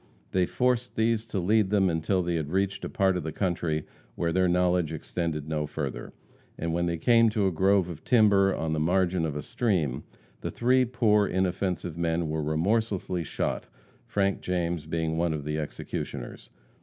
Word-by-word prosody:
They 90 -1 +2
forced 125 -1 0
these 110 0 +1
to 105 - -4
lead 100 +2 +2
them 100 -2 +3
until 90 +2 0
they 85 0 -1
had 80 -3 -2
reached 95 +3 -1
a - - -3
part 95 -1 +2
of 90 - -1
the 80 0 -4
country 85 -5 -1 0.3
where 85 -1 -1
their 95 0 +3
knowledge 90 -2 +2
extended 80 -1 -3
no 75 -1 -1
further, 70 -3 -5 0.5
and 85 0 -2
when 85 +1 0
they 85 0 -1
came 115 +5 +5
to 105 -2 0
a 95 - +2
grove 95 +2 +3
of 80 -3 -8
timber 100 -5 +4
on 80 -3 -2
the 80 - 0
margin 90 +1 +1
of 75 - -4
a 75 - -4
stream, 80 - -1 0.4
the - - -4
three 125 +2 +3
poor 110 -4 +2
inoffensive 90 -2 -1
men 85 -1 0
were 80 0 -1
remorsely 90 +3 0
shot, - - -3 0.4
Frank 100 -1 0
James 85 -3 -2
being 80 0 -1
one 85 -1 +1
of 75 -2 -4
the 75 +1 -2
executioners. 70 -4 -6
90 Hz, 180 wpm, -27 LUFS, 80-100 Hz, 0.5 s, came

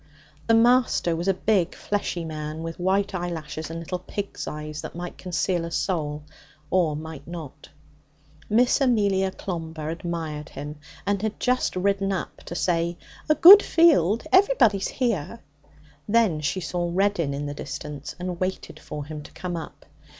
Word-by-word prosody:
The 230 - +5
Master 235 -7 +3
was 170 +3 -3
a 195 - +4
big 190 -2 +1
fleshy 190 -4 -2
man 155 0 -5
with 165 +2 -6
white 195 +3 +1
eyelashes 160 -4 -4
and 165 - -5
little 180 +2 -4
pig's 195 +2 -5
eyes 150 0 -5
that - - -8
might 175 0 -6
conceal 175 0 -1
a 170 - -4
soul 150 -4 -2 0.5
or 170 -5 +2
might 155 -2 -8
not. 160 -4 -9 0.8
Miss 245 +6 +3
Amelia 200 -7 +2
Clomber 165 -5 -5
admired 165 -3 -4
him, 145 +2 -7 0.3
and 200 -1 0
had 220 -1 -3
just 250 -4 +1
ridden 195 +1 +1
up 190 - -3
to 170 - -6
say, 170 -1 0 0.3
'A 305 - +5
good 390 +6 +11
field. 265 - +4
Everybody's 370 - +4
here.' 230 - -2 0.7
Then 215 -8 +3
she 155 +6 -1
saw 175 0 -2
Reddin 185 -5 +1
in 145 +1 -4
the 145 - -4
distance, 145 0 -7
and 180 -1 -4
waited 185 +1 -3
for 150 -1 -7
him 150 0 -7
to - - -13
come 180 -1 -4
up. 165 - -8
175 Hz, 155 wpm, -25 LUFS, 160-200 Hz, 0.8 s, good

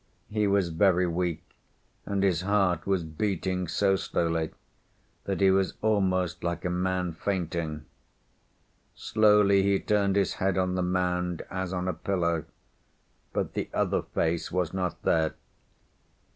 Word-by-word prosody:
He 105 -1 +1
was 100 -3 +2
very 90 +2 +3
weak, 85 -1 -2 0.6
and 100 -1 0
his 90 -4 +2
heart 95 -3 +1
was 95 -3 +1
beating 90 +2 -2
so 95 +3 +2
slowly 80 -2 -1 0.8
that 100 0 -2
he 95 -1 +6
was 95 0 +1
almost 95 -5 +1
like 85 0 -2
a 90 - 0
man 90 -1 -1
fainting. 85 -4 -3 1.1
Slowly 105 -2 +4
he 100 0 +2
turned 100 -2 +1
his 100 -2 +2
head 95 0 +1
on 90 0 +1
the 90 - 0
mound, 90 -1 -1
as 95 -1 -3
on 90 -1 -2
a 90 - 0
pillow, 85 -3 -1 0.9
but - - -2
the - - -3
other - - +1
face 80 0 -1
was 90 -2 -1
not 90 -2 -2
there. 80 -1 +2
90 Hz, 140 wpm, -28 LUFS, 85-100 Hz, 1.1 s, he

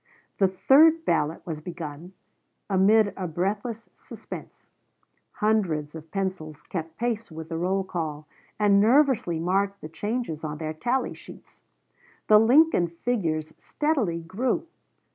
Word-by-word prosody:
The 195 - +5
third 310 - +5
ballot 150 - 0
was 155 -3 -5
begun 165 0 -8 0.6
amid 205 +2 +4
a 185 -2 -4
breathless 205 +7 -3
suspense; - - -10 0.7
hundreds 185 -9 0
of 160 0 -10
pencils 185 -5 -4
kept 165 -2 -6
pace 230 -2 -2
with 160 -1 -9
the 165 - -3
roll 190 +2 0
call, 155 -5 -4 0.3
and 200 -1 +4
nervously 245 - +3
marked 195 +4 0
the 155 - -8
changes 205 -3 -4
on 150 -1 -4
their 155 0 -4
tally 245 +11 -1
sheets. - - -15 0.6
The 210 0 +7
Lincoln 245 - +5
figures 165 -4 -2
steadily 255 - -1
grew. 225 - -1
190 Hz, 125 wpm, -26 LUFS, 160-225 Hz, 0.7 s, The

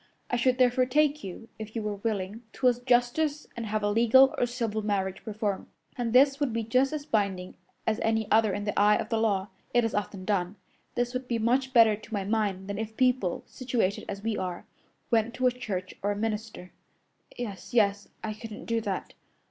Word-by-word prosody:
I - - +2
should 250 +1 +2
therefore 255 0 +3
take 300 +2 +2
you, 195 +4 -8
if 220 +1 -8
you 225 - -2
were 210 -1 -3
willing, 205 0 -3
to 255 - +1
a 250 - +6
justice 245 +5 +1
and 235 -1 -4
have 215 0 -1
a 205 - +2
legal 235 +5 +6
or 245 - +1
civil 230 -3 -2
marriage 195 -2 -2
performed, 210 -2 -3 0.3
and 240 -2 -2
this 275 +3 +5
would 285 -4 +1
be 230 0 -1
just 255 +5 +2
as 300 -2 -4
binding 200 -7 -1 0.3
as 220 +1 0
any 220 0 +1
other 220 -1 +5
in 205 +2 -3
the 205 - -1
eye 210 +1 +6
of 215 - -2
the 225 - +1
law. 200 -3 +1 0.3
It 240 - +5
is 225 - -1
often 195 -2 -3
done. 190 -2 0 0.4
This 245 +1 0
would 255 0 -3
be 235 - 0
much 255 +4 +1
better 225 -4 +6
to 215 +2 -12
my 200 - -1
mind 200 -2 -1
than 200 0 -4
if 220 0 -5
people, 250 -8 +1
situated 240 -6 -1
as 200 0 -5
we 225 -1 0
are, 180 -2 -4 0.5
went 230 0 +2
to 255 - -1
a 250 - +5
church 195 -7 -5
or 205 - 0
a - - -1
minister." 210 -3 -4 0.7
"Yes, 215 -6 -6
yes, 205 -3 +2 0.2
I 215 - -2
couldn't 215 -1 -9
do 230 0 0
that." - - -4
225 Hz, 210 wpm, -28 LUFS, 205-245 Hz, 0.7 s, a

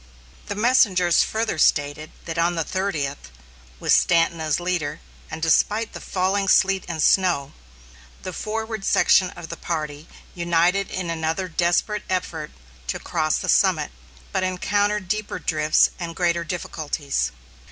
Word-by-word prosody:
The 205 - -3
messengers 200 -7 +4
further 220 -6 -1
stated 145 +1 +2 0.2
that 165 0 -4
on 170 +1 +2
the 165 - 0
thirtieth, 155 - -3 0.5
with - - +2
Stanton 165 -1 +3
as 155 -1 0
leader, 170 -4 -2 0.3
and 160 0 -6
despite 210 +7 +2
the - - -8
falling 195 +1 0
sleet 190 0 +3
and 165 -3 -2
snow, 175 -8 +2 0.7
the 185 - -5
forward 220 +1 -4
section 185 -1 +4
of 165 - -9
the - - -6
party 155 -2 -4 0.3
united 175 +3 +1
in 180 -2 -3
another 165 +3 -2
desperate 175 +5 0
effort 165 -4 -2 0.4
to 65 - -2
cross 155 -2 -1
the - - -4
summit, - - +3 0.4
but - - 0
encountered 205 +2 0
deeper 215 +3 -2
drifts 155 -1 +2
and 170 -2 -5
greater 170 -1 +1
difficulties. 155 -4 -3
175 Hz, 140 wpm, -23 LUFS, 160-195 Hz, 0.7 s, messengers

